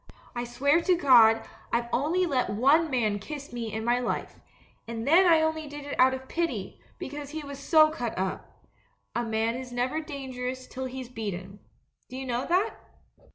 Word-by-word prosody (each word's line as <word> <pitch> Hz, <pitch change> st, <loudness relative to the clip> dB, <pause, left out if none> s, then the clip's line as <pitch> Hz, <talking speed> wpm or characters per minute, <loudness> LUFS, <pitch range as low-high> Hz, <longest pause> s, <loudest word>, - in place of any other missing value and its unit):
I 240 Hz, 0 st, -2 dB
swear 280 Hz, +7 st, +2 dB
to 360 Hz, 0 st, +3 dB
God 235 Hz, -8 st, +6 dB, 0.2 s
I've 235 Hz, 0 st, 0 dB
only 330 Hz, +8 st, +2 dB
let 265 Hz, -, 0 dB
one 280 Hz, +10 st, +3 dB
man 220 Hz, -6 st, 0 dB
kiss 285 Hz, +5 st, -8 dB
me 230 Hz, -2 st, -4 dB
in 220 Hz, +1 st, -4 dB
my 240 Hz, +1 st, +2 dB
life 245 Hz, -, -3 dB, 0.2 s
— -, -, -34 dB
and 230 Hz, +1 st, -5 dB
then 355 Hz, +5 st, +6 dB
I 320 Hz, -1 st, +6 dB
only 315 Hz, -1 st, -1 dB
did 290 Hz, 0 st, -8 dB
it 285 Hz, -, -4 dB
out 260 Hz, +1 st, +5 dB
of 260 Hz, 0 st, -10 dB
pity, 260 Hz, -, -3 dB, 0.2 s
because 290 Hz, 0 st, -6 dB
he 310 Hz, +1 st, -5 dB
was 280 Hz, -1 st, -8 dB
so 310 Hz, +1 st, +5 dB
cut 240 Hz, -7 st, -4 dB
up. 190 Hz, 0 st, -5 dB, 0.5 s
A 240 Hz, -, -1 dB
man 225 Hz, 0 st, 0 dB
is 250 Hz, 0 st, -7 dB
never 250 Hz, +6 st, -1 dB
dan 280 Hz, -4 st, -7 dB
gerous 255 Hz, +1 st, -5 dB
till 260 Hz, 0 st, -5 dB
he's 260 Hz, -1 st, -6 dB
beaten. 200 Hz, -4 st, -6 dB, 0.5 s
Do 255 Hz, -, -7 dB
you 265 Hz, -, -5 dB
know 245 Hz, 0 st, -2 dB
that?' 380 Hz, +6 st, +1 dB
260 Hz, 195 wpm, -27 LUFS, 235-300 Hz, 0.5 s, God